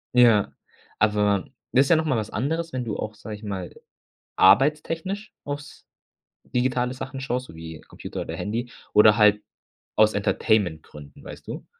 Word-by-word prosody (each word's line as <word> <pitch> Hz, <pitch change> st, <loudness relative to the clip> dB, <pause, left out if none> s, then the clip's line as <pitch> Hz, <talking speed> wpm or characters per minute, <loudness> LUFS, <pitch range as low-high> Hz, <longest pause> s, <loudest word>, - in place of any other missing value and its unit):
Ja, 115 Hz, -5 st, +5 dB, 0.5 s
aber 105 Hz, -2 st, +2 dB, 0.3 s
das 135 Hz, +2 st, +5 dB
ist -, -, -4 dB
ja 170 Hz, -, +6 dB
noch 160 Hz, 0 st, +1 dB
mal 130 Hz, -6 st, +1 dB
was 110 Hz, -1 st, -3 dB
anderes, 160 Hz, +7 st, -2 dB
wenn 125 Hz, -2 st, -3 dB
du 105 Hz, -, -3 dB
auch, 110 Hz, -, -4 dB
sage 105 Hz, 0 st, -8 dB
ich 105 Hz, -, -14 dB
mal, 95 Hz, -4 st, -5 dB, 0.6 s
arbeitstechnisch 155 Hz, -, +2 dB
aufs 145 Hz, 0 st, -7 dB, 0.6 s
digitale 125 Hz, 0 st, 0 dB
Sachen 135 Hz, +1 st, -7 dB
schaust, 125 Hz, -1 st, -2 dB
so 80 Hz, -, -13 dB
wie 80 Hz, -1 st, -9 dB
Computer -, -, -8 dB
oder -, -, -5 dB
Handy 120 Hz, +4 st, -4 dB, 0.2 s
oder 105 Hz, +1 st, +7 dB
halt 105 Hz, -1 st, +4 dB, 0.5 s
aus 110 Hz, 0 st, +4 dB
Entertainmentgründen, 85 Hz, -, -1 dB
weißt -, -, -11 dB
du? -, -, -7 dB
110 Hz, 160 wpm, -24 LUFS, 105-135 Hz, 0.6 s, oder